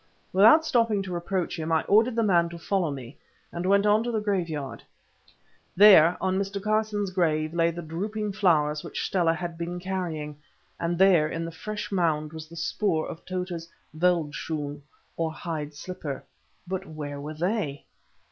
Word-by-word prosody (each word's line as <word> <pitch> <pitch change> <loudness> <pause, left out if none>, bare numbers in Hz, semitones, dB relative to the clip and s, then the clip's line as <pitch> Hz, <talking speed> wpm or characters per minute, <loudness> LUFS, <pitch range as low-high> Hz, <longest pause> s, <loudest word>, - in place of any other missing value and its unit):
Without 225 +12 +7
stopping 230 -8 +2
to 185 -2 -6
reproach 175 0 -2
him, 160 +1 -3
I 160 -1 +3
ordered 225 +3 +3
the 230 - +2
man 170 -5 +3
to 170 - -8
follow 180 0 0
me, 135 -1 -7 0.3
and 175 +2 -3
went 200 +1 +4
on 210 +1 +4
to 240 - -3
the 220 - 0
graveyard. 170 - -2 0.9
There, 180 -4 +8
on 190 0 0
Mr. 200 0 -3
Carson's 210 -1 0
grave, 155 -4 0
lay 170 0 +3
the 170 +1 -6
drooping 205 +6 -3
flowers 155 -7 +2
which - - -4
Stella 170 -3 +2
had 170 -1 -6
been 175 +1 -4
carrying, 170 -6 -4 0.4
and 170 0 -1
there 180 -5 +5
in 165 +1 -3
the 165 - -5
fresh 210 +6 -6
mould 160 -5 0
was 160 -1 -8
the 165 - -13
spoor 165 0 0
of 165 - -8
Tota's 180 -2 -4 0.3
veldschoon, 155 -3 -1 0.4
or 165 -1 -1
hide 155 -3 -5
slipper. 150 -3 -6 0.4
But 190 +1 -4
where 145 -2 -6
were 150 +2 -6
they? 170 -4 -2
175 Hz, 165 wpm, -26 LUFS, 155-195 Hz, 0.9 s, There